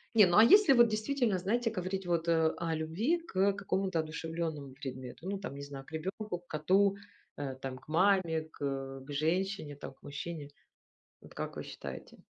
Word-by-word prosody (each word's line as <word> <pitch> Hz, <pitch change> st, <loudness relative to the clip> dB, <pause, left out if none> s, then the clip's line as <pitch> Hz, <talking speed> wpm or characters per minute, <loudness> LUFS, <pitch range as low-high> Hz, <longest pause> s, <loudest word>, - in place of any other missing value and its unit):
Не, 210 Hz, -3 st, +9 dB
ну, 175 Hz, +1 st, +3 dB
а 215 Hz, -, +10 dB
если 400 Hz, -, +8 dB
вот 240 Hz, -1 st, +7 dB
действительно, 220 Hz, -1 st, +1 dB
знаете, 230 Hz, +6 st, 0 dB
говорить 190 Hz, -1 st, -3 dB
вот, 170 Hz, -1 st, 0 dB
э, 160 Hz, -1 st, +4 dB
о 165 Hz, -1 st, -1 dB
любви 195 Hz, -, 0 dB
к, 335 Hz, -, -11 dB
э, 195 Hz, +1 st, +4 dB
какому-то 195 Hz, -3 st, -1 dB
одушевлённому 160 Hz, -3 st, -4 dB
предмету, 130 Hz, +4 st, -7 dB
ну, 200 Hz, -, -1 dB
там, 190 Hz, -8 st, -6 dB
не 140 Hz, -, -7 dB
знаю, 140 Hz, -1 st, -8 dB
к -, -, -16 dB
ребенку, 185 Hz, +4 st, -4 dB
к 175 Hz, -, -29 dB
коту, 190 Hz, +6 st, +3 dB, 0.4 s
э, 135 Hz, -2 st, -4 dB
там 130 Hz, -1 st, -6 dB
к 130 Hz, -, -18 dB
маме, 170 Hz, -2 st, +3 dB
к -, -, -9 dB
э, 135 Hz, -1 st, -3 dB
к 145 Hz, -, -9 dB
женщине 160 Hz, +1 st, -1 dB
там, -, -, -8 dB
к -, -, -33 dB
мужчине. 145 Hz, +1 st, -6 dB, 0.7 s
Вот -, -, -15 dB
как -, -, -5 dB
вы -, -, -4 dB
считаете? -, -, -8 dB
170 Hz, 195 wpm, -32 LUFS, 145-200 Hz, 0.7 s, а